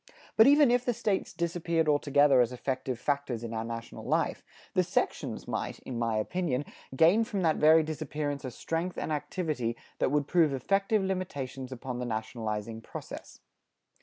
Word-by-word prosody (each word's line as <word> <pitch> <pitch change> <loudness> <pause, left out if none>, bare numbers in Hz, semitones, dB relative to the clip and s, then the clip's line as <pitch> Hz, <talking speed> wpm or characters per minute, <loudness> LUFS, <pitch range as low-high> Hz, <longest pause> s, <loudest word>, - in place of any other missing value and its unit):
But 220 - +7
even 285 -2 +6
if 245 0 +3
the 245 -2 0
States 205 -4 -1
disappeared 170 -1 -1
altogether 145 -2 +4
as 120 0 +1
effective 130 -1 -3
factors 140 -5 -1
in 115 -1 -5
our 110 0 -2
national 115 0 -6
life, - - 0 0.3
the - - +4
sections - - -2
might, - - -3
in 125 -3 -5
my 115 -2 0
opinion, 145 - -1 0.3
gain 170 +10 +5
from 210 -5 -2
that 160 -2 +3
very 160 +1 +6
disappearance 150 -2 -3
a 130 - -3
strength 165 +7 -3
and - - -3
activity 150 -7 -2 0.2
that - - +2
would 145 +1 +1
prove 165 -5 +3
effective 195 - +1
limitations 140 -9 -4
upon 130 -1 -5
the 125 - -2
nationalizing 110 -1 -4
process. - - -9
145 Hz, 165 wpm, -29 LUFS, 125-175 Hz, 0.3 s, But